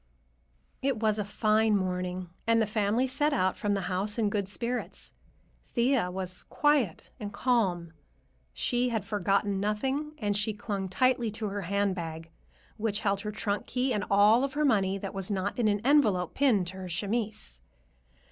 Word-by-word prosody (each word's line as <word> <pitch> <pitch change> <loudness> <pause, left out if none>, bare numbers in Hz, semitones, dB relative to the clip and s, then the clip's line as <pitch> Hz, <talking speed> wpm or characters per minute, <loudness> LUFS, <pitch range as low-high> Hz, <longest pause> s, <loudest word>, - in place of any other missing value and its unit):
It 270 -3 0
was 215 -1 +1
a - - +1
fine 215 +1 +2
morning, 180 -1 -3 0.2
and 230 0 +4
the 220 - +3
family 215 +3 +1
set 290 +3 +1
out 185 -8 +1
from 205 -1 0
the 195 - -1
house 190 +4 -1
in 215 -3 +1
good 200 -2 -1
spirits. 235 +6 -4 0.5
Thea 240 -5 +1
was 180 0 -3
quiet 290 - +1
and 205 -1 -5
calm. 190 -11 0 0.6
She 245 - 0
had 220 -4 -2
forgotten 200 0 0
nothing, 265 +9 -1
and 205 -7 -1
she 210 +1 0
clung 200 -2 -4
tightly 250 +2 +2
to 215 -1 -3
her 200 +1 -3
handbag, 175 -4 -2 0.5
which 215 -1 -1
held 200 -1 0
her 210 - -4
trunk 210 -1 -2
key 255 +1 0
and 205 - -1
all 210 +5 +5
of 275 0 -2
her 300 0 +2
money 195 -7 +2
that 195 0 -6
was 195 -1 -2
not 200 +2 -2
in 230 - +3
an 205 -1 +1
envelope 215 - +3
pinned 245 -10 +3
to 190 - -9
her 185 -1 -6
chemise. 200 - -3
205 Hz, 170 wpm, -29 LUFS, 190-235 Hz, 0.6 s, all